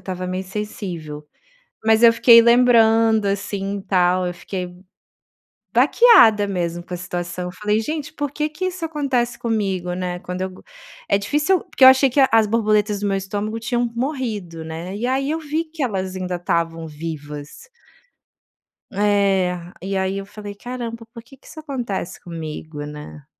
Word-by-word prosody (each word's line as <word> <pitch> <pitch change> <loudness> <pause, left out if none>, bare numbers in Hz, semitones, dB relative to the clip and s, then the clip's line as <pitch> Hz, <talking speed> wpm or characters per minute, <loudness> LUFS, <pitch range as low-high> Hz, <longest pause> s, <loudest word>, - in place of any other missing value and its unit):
estava 185 -1 -5
meio 185 +1 -3
sensível. 180 -7 -6 0.6
Mas 220 0 +4
eu 235 -1 +8
fiquei 230 0 +7
lembrando, 225 -2 +4
assim, 200 0 -3
tal, 180 -1 +2
eu 175 - -3
fiquei 180 0 -6 1.0
baqueada 230 - +6
mesmo 175 -3 -3
com 180 - -7
a - - -3
situação, 175 0 -5
eu 180 - -6
falei: 210 +2 0
"Gente, 305 +5 -4
por 290 -2 -3
que 300 +2 -2
que 335 +5 -4
isso 365 -2 -4
acontece 265 -6 -1
comigo, 195 -6 -2
né, 180 -1 -4
quando 180 +1 -5
eu 190 - -3
go" 185 - -15 0.5
é 200 - +3
difícil 295 - +1
porque - - -6
eu - - +12
achei 265 +1 +6
que 275 - +2
a 265 - +5
as 225 -1 +4
borboletas 210 -2 +1
do 205 - -1
meu 195 - 0
estômago 205 +3 -3
tinham 240 +1 -1
morrido, 225 - -3
né, 165 +4 -6
e 235 - -2
aí 270 +2 0
eu 320 - -1
vi 310 +1 -2
que 315 -2 -7
elas 190 -6 -2
ainda 185 -1 -3
estavam 165 -1 -2
vivas. 150 - -8 1.2
É, 195 -3 +2 0.3
e 195 +1 -3
aí 190 +1 -1
eu 195 - -6
falei: 205 0 -9
"Caramba, 235 +1 -6
por 230 -2 -10
que 270 +3 -17
que - - -23
isso - - -12
acontece 245 - -5
comigo, 155 -3 -7
né". 150 -1 -10
205 Hz, 170 wpm, -21 LUFS, 180-240 Hz, 1.2 s, eu